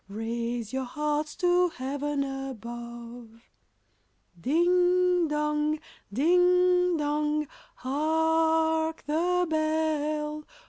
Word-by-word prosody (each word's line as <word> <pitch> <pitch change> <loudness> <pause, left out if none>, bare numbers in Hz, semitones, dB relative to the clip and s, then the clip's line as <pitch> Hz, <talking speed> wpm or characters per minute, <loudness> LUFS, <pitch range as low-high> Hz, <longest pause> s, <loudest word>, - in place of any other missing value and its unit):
Raise 230 +2 -4
your 265 0 -2
hearts 300 +3 -2
to 355 0 +3
Heaven 285 0 -3
above! 240 -3 -7
Chorus. 225 +1 -22 1.0
Ding 355 - +3
dong! 300 0 0 0.3
ding 360 - +3
dong! 300 0 0 0.3
hark, 320 - +1
the 355 +4 +1
bell! 310 -1 -1
300 Hz, 80 wpm, -27 LUFS, 270-325 Hz, 1.0 s, to